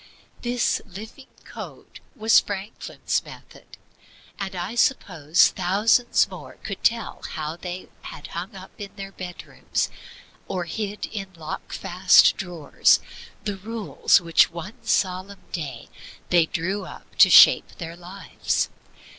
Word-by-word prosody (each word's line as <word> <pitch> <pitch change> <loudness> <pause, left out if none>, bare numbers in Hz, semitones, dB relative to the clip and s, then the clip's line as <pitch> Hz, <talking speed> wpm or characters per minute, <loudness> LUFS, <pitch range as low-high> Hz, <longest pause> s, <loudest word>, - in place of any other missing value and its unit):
This 245 0 0
living 220 +8 -11 0.2
by - - -16
code - - -10 0.2
was 220 +1 +5
Franklin's 200 +2 -3
method; - - -14 0.6
and 195 -1 -4
I 180 +4 -4
suppose 175 - +3
thousands 210 +7 +2
more - - -10
could - - -6
tell 230 -3 0
how 155 0 -4
they 180 +1 -7
had 145 - -9
hung 180 +4 -5
up 190 0 -11
in 200 -1 -8
their 195 -1 -7
bedrooms, 180 -2 -4 0.6
or 180 - -2
hid 205 +4 -4
in 195 -3 -6
locked 160 -1 -7
fast 185 +2 +5
drawers, 175 -6 +2 0.4
the 205 -2 -3
rules 215 +1 +2
which 170 -2 +4
one 175 +8 -9
solemn 190 +1 -1
day 140 -9 -5 0.4
they 170 -2 +5
drew 190 +5 -2
up - - -12
to - - +8
shape - - +7
their 165 -1 -6
lives. 180 +3 -3
190 Hz, 130 wpm, -24 LUFS, 175-205 Hz, 0.6 s, to